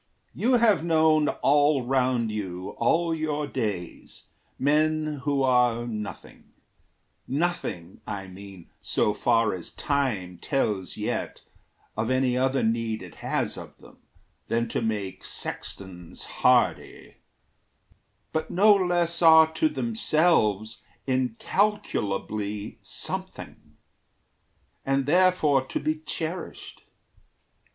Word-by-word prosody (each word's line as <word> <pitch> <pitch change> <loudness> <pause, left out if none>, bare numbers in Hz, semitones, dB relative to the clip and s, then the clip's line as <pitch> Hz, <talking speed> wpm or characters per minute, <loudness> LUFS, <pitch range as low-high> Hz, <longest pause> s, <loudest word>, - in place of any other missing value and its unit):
You 255 +3 +1
have 230 -8 +4
known 160 -2 +3
All 145 -1 +3
round 125 -3 +1
you, 95 -3 -5
all 165 +7 +2
your 155 -2 -2
days, 105 -11 -5 0.3
men 155 +1 +1
who 140 -2 +1
are 125 -2 +3
nothing 105 -3 -8 0.7
Nothing, 135 - -3
I 100 -1 -4
mean, 95 -1 -12
so 105 - +1
far 115 0 +2
as 90 -3 -6
time 115 - -2
tells 105 -9 -1
yet - - -3 0.5
Of 110 +2 -1
any 130 -1 +2
other 130 +1 +1
need 115 -1 -1
it - - -11
has - - -1
of - - -12
them - - -17 0.5
Than 115 +1 0
to - - -2
make 105 -4 -3
sextons 90 -3 -5
hardy - - +1 1.2
but 160 0 -2
no 205 +4 +6
less 175 -3 +1
Are 160 -1 +7
to 315 - +2
themselves 155 - +1 0.2
incalculably 110 - -1
something, - - -6 1.1
And 135 0 0
therefore 160 -4 +3
to - - -2
be 155 +1 -1
cherished. 165 +2 -5
130 Hz, 105 wpm, -26 LUFS, 110-160 Hz, 1.2 s, Are